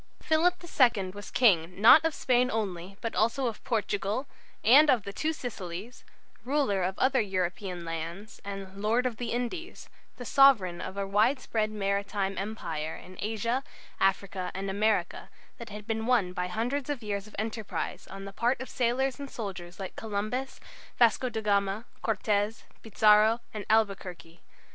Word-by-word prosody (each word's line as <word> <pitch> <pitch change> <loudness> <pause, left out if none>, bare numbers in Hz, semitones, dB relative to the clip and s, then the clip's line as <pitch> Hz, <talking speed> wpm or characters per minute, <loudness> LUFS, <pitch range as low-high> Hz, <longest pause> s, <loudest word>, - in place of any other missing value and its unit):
Philip 335 +3 +2
II 235 - +2
was 205 +1 -9
King 180 -7 +3
not 255 +9 +8
of 325 -2 0
Spain 250 0 +2
only, 195 -4 -3
but 230 - -3
also 230 +5 +1
of 230 -3 -3
Portugal 215 +1 -1 0.4
and 285 +7 +7
of 240 -7 +4
the 200 - -7
Two 310 +9 -1
Sicilies, 220 - -7 0.4
ruler 260 -7 +1
of 185 +1 -1
other 260 -1 +3
European 185 -2 -3
lands 165 +6 -6
and 195 -1 -7
"Lord 230 +4 +2
of 240 -3 -1
the 240 -2 -4
Indies," 250 +10 -4 0.3
the 245 - -7
Sovereign 230 -11 +5
of 190 - -6
a 200 - -1
widespread 215 +2 +1
maritime 200 -1 -1
Empire 160 -7 -4
in 185 - -12
Asia, 230 +5 -1 0.4
Africa, 190 -1 0
and 195 +1 -3
America, 205 -3 0 0.3
that 235 -2 -8
had 210 0 -8
been 225 0 -2
won 215 -8 +2
by 180 0 -2
a - - -5
hundred 250 +8 -2
years 200 -1 -3
of 215 - -13
enterprise 220 0 -4
on 195 0 -8
the 195 - -8
part 240 +5 +1
of 260 - -6
sailors 255 +2 0
and 280 -1 -6
soldiers 190 -6 -7
like 190 -1 -6
Columbus 220 +5 -3
and - - -20 0.3
Vasco 240 +2 +4
da 220 -2 -3
Gama, 200 +1 +1 0.2
Cortes, 210 0 0 0.2
Pizarro, 215 +1 +4
and 210 -2 -6
Albuquerque. 195 -6 0
215 Hz, 160 wpm, -29 LUFS, 195-240 Hz, 0.4 s, not